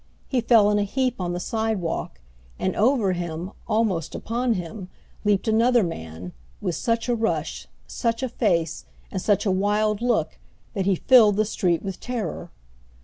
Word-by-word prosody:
He 255 -3 +1
fell 225 -3 +5
in 205 - +2
a - - +2
heap 250 +2 -1
on 175 -1 -2
the 175 - -3
sidewalk; 205 - -2 0.4
and 185 - -1
over 225 -3 +3
him, 175 +1 -4 0.2
almost 210 -8 0
upon 235 +1 -1
him, 180 +1 -6 0.3
leaped 205 -1 +1
another 230 +1 +4
man, 85 - -6 0.3
with 175 - -2
such 230 +6 -1
a 245 - +2
rush, 225 -1 -2 0.2
such 230 +1 -2
a 260 - -1
face, 170 -9 0 0.3
and 190 - -3
such 205 +1 +2
a 195 - +2
wild 210 +2 +1
look, 220 -11 0 0.3
that 195 -2 -1
he 195 - +4
filled 220 0 +6
the 215 +1 +2
street 175 -5 0
with 195 -2 -5
terror. 230 -9 -4
205 Hz, 165 wpm, -24 LUFS, 180-230 Hz, 0.4 s, filled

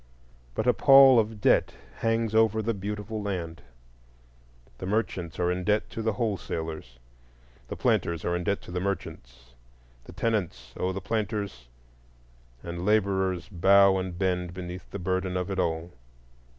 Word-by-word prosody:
But - - -1
a 125 - +4
pall 135 -3 +7
of 110 -1 -2
debt - - +3 0.2
hangs 115 -1 0
over 110 -1 +3
the 115 +2 0
beautiful 105 +2 -5
land; 90 -5 -4 1.2
the 95 - -5
merchants 95 -6 -2
are 90 0 +1
in 90 0 -2
debt 105 +2 0
to 115 - -5
the 110 0 0
wholesalers, 80 - -4 0.7
the - - -5
planters 85 -2 0
are 85 - 0
in 90 - -2
debt 100 +3 -1
to - - -10
the 90 - -2
merchants, 60 -10 -6 0.5
the - - -11
tenants 95 - -2
owe 90 - -1
the 95 +1 -5
planters, 105 - -3 1.0
and 85 0 -5
laborers 95 -3 +1
bow 100 0 +5
and 95 -2 -5
bend 90 -1 -1
beneath 90 -1 -7
the - - -6
burden 95 0 -1
of 90 +2 -3
it 95 - -2
all. 80 0 -1
95 Hz, 150 wpm, -27 LUFS, 90-105 Hz, 1.2 s, pall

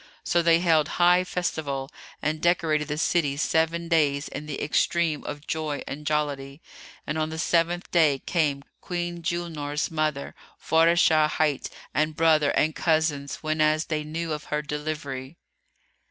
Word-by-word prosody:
So 175 - +2
they 165 0 +5
held 160 -4 +3
high 180 +1 +5
festival 150 -7 -3 0.3
and 155 +1 -1
decorated 160 -3 +1
the 150 0 -3
city 150 -4 +1
seven 165 +2 0
days, 150 -4 +2
in 150 +2 -7
the 145 - -4
extreme 160 +1 +1
of 145 +1 -6
joy 155 -3 -3
and 150 +1 -6
jollity: 145 -2 -2 0.5
and 155 +1 -2
on 155 0 0
the 160 - -6
seventh 170 +2 0
day 155 -5 +4
came 145 -2 -1 0.2
Queen 175 -1 -4
Julnar's 165 -3 -3
mother, 155 -3 -2 0.3
Faráshah 160 -1 +4
hight,[FN#312] 155 -3 0 0.2
and 155 +2 0
brother 155 -3 +4
and 155 +1 +2
cousins, 155 -4 0
whenas 155 0 +2
they 155 -2 -1
knew 160 +1 -3
of 150 0 -6
her 150 0 -2
delivery. 150 -1 -5
155 Hz, 145 wpm, -25 LUFS, 150-165 Hz, 0.5 s, they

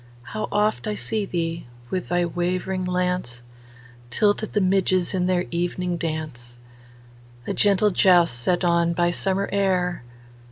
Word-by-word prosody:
How 215 - -4
oft 210 +1 0
I 210 - -1
see 215 0 -2
thee, 165 -4 -3 0.2
with 185 -2 -3
thy 175 0 +2
wavering 180 +2 -2
lance, 180 -9 -2 0.7
Tilt 205 - +2
at 215 - -6
the 210 - +2
midges 185 -2 +1
in 180 -1 0
their 180 -1 +1
evening 175 +1 -1
dance,A 120 -5 -8
gentle 205 0 +3
joust 175 -5 +4
set 175 +9 0
on 170 -1 +2
by 175 0 +1
summer 195 +2 0
air! 185 -4 0
175 Hz, 135 wpm, -23 LUFS, 165-190 Hz, 0.7 s, joust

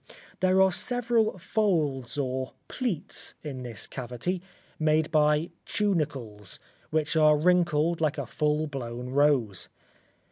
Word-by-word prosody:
There 185 0 +3
are 190 - +4
several 230 +1 +1
folds 155 - 0
or 130 -1 -2
pleats 235 - -2
in 135 -4 -5
this 120 -4 -4
cavity, 130 +9 -4 0.4
made 155 0 +2
by 150 +1 +3
tunicles, 140 - -2 0.3
which 155 +1 0
are 155 -1 +6
wrinkled 170 -1 +2
like 155 -1 +1
a - - -2
full 150 0 0
blown 125 -4 -5
rose. 130 -9 +2
150 Hz, 115 wpm, -28 LUFS, 130-175 Hz, 0.4 s, are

